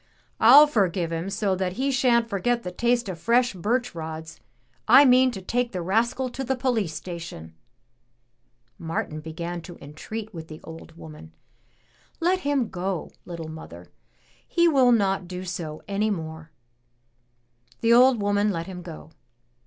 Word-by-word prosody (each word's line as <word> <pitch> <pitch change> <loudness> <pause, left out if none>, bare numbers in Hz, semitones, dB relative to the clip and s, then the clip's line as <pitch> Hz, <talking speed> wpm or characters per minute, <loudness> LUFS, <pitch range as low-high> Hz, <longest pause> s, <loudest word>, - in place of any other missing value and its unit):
"I'll 270 +7 +9
forgive 185 - 0
him 165 +3 -3
so 195 -1 0
that 185 -1 -2
he 270 +6 -1
shan't 245 -3 +2
forget 235 +3 -1
the 180 - -5
taste 235 +4 0
of 180 -3 -6
fresh 240 +5 +2
birch 240 +7 -1
rods. 160 -1 -7 0.5
I 285 - +8
mean 255 0 +5
to 195 -6 -7
take 240 +4 -1
the 180 - -3
rascal 230 +7 0
to 265 +2 -5
the 265 +1 -1
poUce 245 -8 0
station." 165 - -8 1.3
Martin 160 -1 -4
began 170 +2 -6
to 175 +1 -11
entreat 210 +9 -8
with 160 -2 -8
the 155 -1 -10
old 165 0 -11
woman. 150 - -12 0.8
"Let 360 +2 +2
him 285 -8 0
go, 185 -1 -4
little 170 -2 -7
mother; 90 - -11 0.6
he 340 0 +3
will 265 -6 +4
not 195 -5 +1
do 180 +1 -6
so 165 -4 -6
any 205 +2 0
more." 160 -4 -5 1.3
The 230 0 +4
old 250 0 +6
woman 205 +1 +1
let 165 -4 -3
him 185 -2 -8
go. 165 -2 -10
195 Hz, 155 wpm, -25 LUFS, 165-240 Hz, 1.3 s, I'll